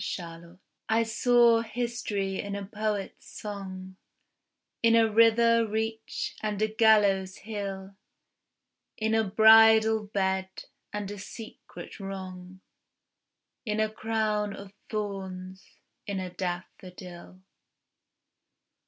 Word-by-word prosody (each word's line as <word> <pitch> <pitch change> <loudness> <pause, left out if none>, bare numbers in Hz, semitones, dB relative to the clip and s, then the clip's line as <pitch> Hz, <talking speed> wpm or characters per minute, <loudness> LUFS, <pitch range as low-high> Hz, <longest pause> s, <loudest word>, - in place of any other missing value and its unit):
SYMBOLS 170 -1 -7 0.3
I 225 +1 +3
saw 235 0 +4
history 225 -4 -3
in 200 0 -4
a 200 -1 -5
poet's 210 -1 -4
song, 190 -2 -7 0.8
In 230 0 +4
a 225 -1 +5
river 230 +1 +4
reach 220 +1 -3
and 210 -2 -2
a 215 - +2
gallows 210 -4 +3
hill, 195 -2 -6 1.0
In 220 0 0
a 225 0 +3
bridal 220 +1 +6
bed, 190 -2 -1 0.4
and 205 -1 -4
a 205 - -7
secret 220 +2 -10
wrong, 190 -1 -8 1.0
In 215 -2 -2
a 215 0 +2
crown 215 -2 -1
of 200 0 -11 0.2
thorns: 190 -3 -6 0.4
in 200 -1 -2
a 185 -1 -5
daffodil. 180 0 -7
205 Hz, 100 wpm, -28 LUFS, 190-220 Hz, 1.0 s, bridal